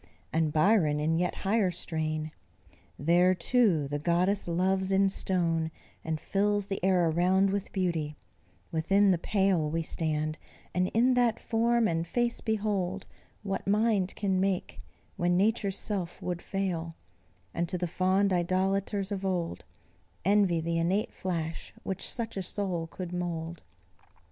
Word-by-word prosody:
And 160 -1 +2
Byron, 155 -2 +3
in 160 +2 +1
yet 180 - 0
higher 200 -1 +3
strain: 155 -3 -3 0.7
"There, 175 +5 +4
too, 190 - +2
the 145 +1 -3
goddess 180 +6 +1
loves 190 +2 +1
in 195 0 +4
stone, 170 -4 0 0.3
and 160 -1 -2
fills 205 +2 0
The 195 -2 -4
air 185 -2 +3
around 185 +4 +3
with 200 -1 -3
beauty; 170 -6 -1 0.6
within 195 +5 +3
the 175 - +1
pale 190 -6 +1
We 165 +2 -1
stand, 155 -1 -2 0.3
and 180 0 +1
in 250 +3 +4
that 240 -3 +2
form 235 0 +2
and 165 -1 -1
face 240 +4 0
behold 200 -4 -1 0.4
What 195 -1 -3
Mind 205 -2 +2
can 190 -3 0
make, 190 -1 -1 0.4
when 175 0 +2
Nature's 200 -1 +1
self 190 -5 -3
would 175 -1 -4
fail; 170 -4 -3 0.6
And 170 0 -1
to 180 - -1
the 180 - -1
fond 185 +3 +2
idolaters 190 +3 0
of 195 -1 -3
old 180 -3 -2 0.6
Envy 195 -4 +3
the 165 +1 -1
innate 190 +6 0
flash 165 -3 -4
which 190 - -3
such 230 -3 -4
a - - -1
soul 180 -3 -2
could 180 +1 -7
mould. 170 -1 -4
185 Hz, 145 wpm, -29 LUFS, 165-200 Hz, 0.7 s, There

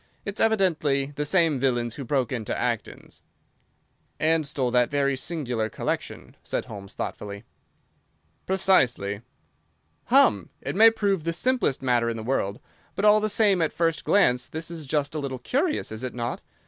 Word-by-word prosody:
It's 200 0 -4
evidently 155 -10 +2
the 150 +1 -3
same 165 -4 +2
villains 120 -3 0
who 140 - -6
broke 135 0 0
into 115 -5 -3
Acton's." - - -4 1.0
"And 160 -1 +2
stole 130 -3 -1
that 125 0 +3
very 140 -1 +1
singular 125 -7 -2
collection," - - -4
said - - -3
Holmes, 100 -2 -10
thoughtfully. 100 0 -5 1.0
"Precisely." 125 - +2 0.8
"Hum! - - +4
It - - -5
may 225 +3 +8
prove 200 -6 0
the 170 +1 -1
simplest 235 - 0
matter 120 -2 +2
in 115 - -3
the 110 - -6
world, 110 -4 -1 0.4
but 200 - 0
all 210 0 +7
the 215 0 0
same 205 -3 +3
at 160 - +1
first 165 -2 0
glance 125 -12 +3
this 160 +1 -6
is 160 -4 -7
just 145 0 -1
a 155 - -2
little 135 -2 -4
curious, 280 - -1
is 110 +1 -5
it 130 -1 -4
not? 120 -1 -3
145 Hz, 160 wpm, -25 LUFS, 125-185 Hz, 1.0 s, may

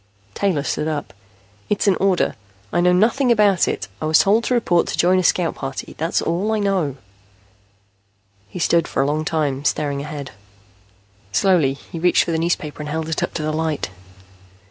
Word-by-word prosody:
_" - - -32
Taylor 180 - 0
stood 150 +1 -2
up. 150 -2 -4 0.6
"It's 210 +1 0
an 195 - +5
order. 190 -2 +1 0.4
I 175 - +2
know 180 0 +4
nothing 235 +8 +3
about 205 -5 +4
it. - - -3
I - - -2
was 155 0 +4
told 215 +4 +3
to 250 - +1
report 175 -7 +2
to - - -3
join 185 +2 +4
a - - 0
scout 175 -1 +2
party. 135 -1 -6
That's 165 +2 0
all 180 +6 -1
I - - +1
know." 190 -9 0 1.5
He - - -9
stood 170 -1 +2
for 135 - 0
a - - 0
long 155 +2 -1
time, 145 -4 -1
staring 140 -1 -1
ahead. 145 -2 -7 1.0
Slowly, 155 - +3
he 150 +4 -10
reached 175 +2 +4
for - - -3
the 160 - 0
newspaper 160 -3 -2
and 150 - -5
held 160 +1 -3
it 160 - -2
up - - -3
to 155 - -2
the 155 0 -1
light. 155 -8 -2
165 Hz, 190 wpm, -20 LUFS, 150-185 Hz, 1.5 s, an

